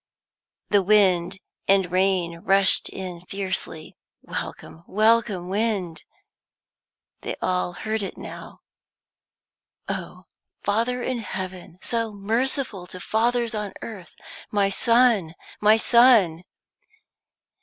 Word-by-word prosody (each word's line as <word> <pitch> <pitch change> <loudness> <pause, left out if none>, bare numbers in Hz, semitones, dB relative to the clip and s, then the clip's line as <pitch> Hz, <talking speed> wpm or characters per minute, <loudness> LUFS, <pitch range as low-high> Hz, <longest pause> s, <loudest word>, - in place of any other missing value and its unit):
The 205 -1 +5
wind 190 -2 +3 0.3
and 195 -2 +3
rain 185 -2 +1
rushed 195 +2 +4
in 180 -2 -7
fiercely. 190 -5 -4 0.3
Welcome, 165 - -7
welcome 215 -3 +2
wind! 195 -5 -2 1.2
They - - -4
all 180 -1 -1
heard 220 +3 -3
it 195 - -5
now. - - -10 1.3
"Oh, - - -6 0.4
Father 235 +4 0
in 255 -2 -2
heaven, 185 -4 -6
so 230 -2 -1
merciful 220 -1 -2
to 185 - -9
fathers 235 +4 0
on 210 -2 -4
earth 200 -6 -9 0.3
my 200 -1 +1
son, 230 -6 +3 0.3
my 215 +1 +6
son!" 225 -9 +4
200 Hz, 100 wpm, -24 LUFS, 185-225 Hz, 1.3 s, my